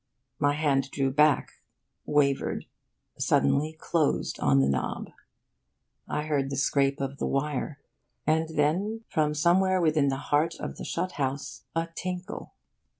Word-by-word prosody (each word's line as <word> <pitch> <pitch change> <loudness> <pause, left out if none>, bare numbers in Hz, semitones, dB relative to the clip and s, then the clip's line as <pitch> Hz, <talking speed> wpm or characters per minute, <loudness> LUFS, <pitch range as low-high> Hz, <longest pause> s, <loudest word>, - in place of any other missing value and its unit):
My 145 -1 +3
hand 140 -3 +1
drew 135 -1 0
back, 150 +1 +2 0.5
wavered, 140 -2 +1 0.5
suddenly 140 - +2
closed 165 -4 0
on 70 -1 +4
the 70 - +4
knob. 70 -1 -2 1.0
I 150 - -2
heard 145 -3 0
the 135 - -3
scrape 140 +1 +2
of 140 0 -4
the - - 0
wire 140 +1 -2 0.5
and 160 +1 +2
then, 175 +9 0
from 150 -1 +1
somewhere 185 +4 +3
within 155 -4 +3
the 135 - +1
heart 150 +4 +1
of - - -5
the - - -6
shut 180 +2 -2
house, 135 +1 -3
a 165 0 0
tinkle. 180 +1 -5
150 Hz, 140 wpm, -28 LUFS, 140-160 Hz, 1.0 s, on